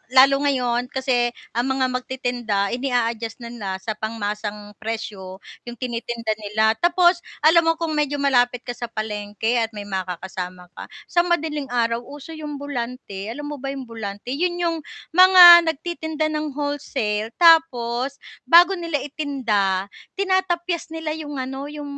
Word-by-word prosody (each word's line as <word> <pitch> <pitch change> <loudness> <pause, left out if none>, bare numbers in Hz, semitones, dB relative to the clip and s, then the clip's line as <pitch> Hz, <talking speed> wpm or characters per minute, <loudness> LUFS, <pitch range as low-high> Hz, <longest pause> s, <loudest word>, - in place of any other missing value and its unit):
lalo, 275 +1 +7
ngayon 250 -3 0
kasi 250 -3 0 0.2
ang 240 +3 -1
mga 260 -1 0
magtitinda 245 -5 -2
ini-a-adjust 235 -2 -2
na 235 - -7
nila 210 -5 -6
sa 190 +4 -5
pangmasang 210 -1 -5
presyo 210 -4 -6 0.2
yung 240 - -6
tini-tinda 235 -2 -4
nila. 220 +1 +1
Tapos 345 0 +4 0.2
alam 325 +1 +5
mo 330 - +3
kung 330 -1 -3
medyo 295 -2 0
malapit 245 -3 +2
ka 245 - -5
sa 240 0 -6
palengke 215 +1 -2
at 225 -1 -2
may 205 - -5
makakasama 185 -1 -6
ka - - -8 0.2
sa 350 0 +2
madaling 300 -4 -1
araw, 235 -1 0
uso 290 +2 -10
yung 300 -2 -6
alam 250 -4 -4 0.5
mo 290 -2 -6
ba 275 - -6
yung 270 -1 -4
bulante? 225 -1 -7
Yun, 345 +5 0
yung 340 -2 -1 0.3
mga 350 -1 +9
nagti-tinda 315 -1 -2
ng 305 -2 -3
wholesale 240 -7 -2
tapos 275 -6 +3 0.3
bago 345 +6 +7
nila 330 -5 -2
itinda 220 -10 -1 0.2
tinatapyas 365 -3 0
nila 320 -1 -3
yung 295 -2 -6
ano, 265 +2 -5
yung 295 0 -7
255 Hz, 145 wpm, -22 LUFS, 225-305 Hz, 0.5 s, mga